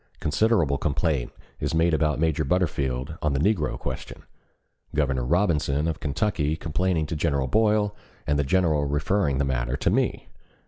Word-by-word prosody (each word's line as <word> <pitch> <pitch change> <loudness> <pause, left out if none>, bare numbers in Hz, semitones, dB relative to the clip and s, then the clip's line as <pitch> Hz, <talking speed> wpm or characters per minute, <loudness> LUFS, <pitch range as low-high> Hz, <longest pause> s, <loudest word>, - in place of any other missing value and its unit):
Considerable 80 -4 +2
complaint 70 -2 0 0.3
is - - -2
made 85 +1 +3
about 75 -1 +1
Major 80 0 +1
Butterfield 70 -3 -1
on 75 -3 +1
the 70 - 0
negro 85 -2 +1
question; - - -6 0.7
Governor 70 -4 +1
Robinson 75 -2 +1
of 80 - -2
Kentucky 75 +1 -1
complaining 80 +1 -1
to 80 - -4
General 70 -3 0
Boyle 105 - +2 0.3
and 75 0 +1
the - - +3
general 75 -1 +2
referring 75 +1 0
the 70 - +1
matter 60 -1 -1
to - - +1
me. - - 0
75 Hz, 150 wpm, -25 LUFS, 70-85 Hz, 0.7 s, made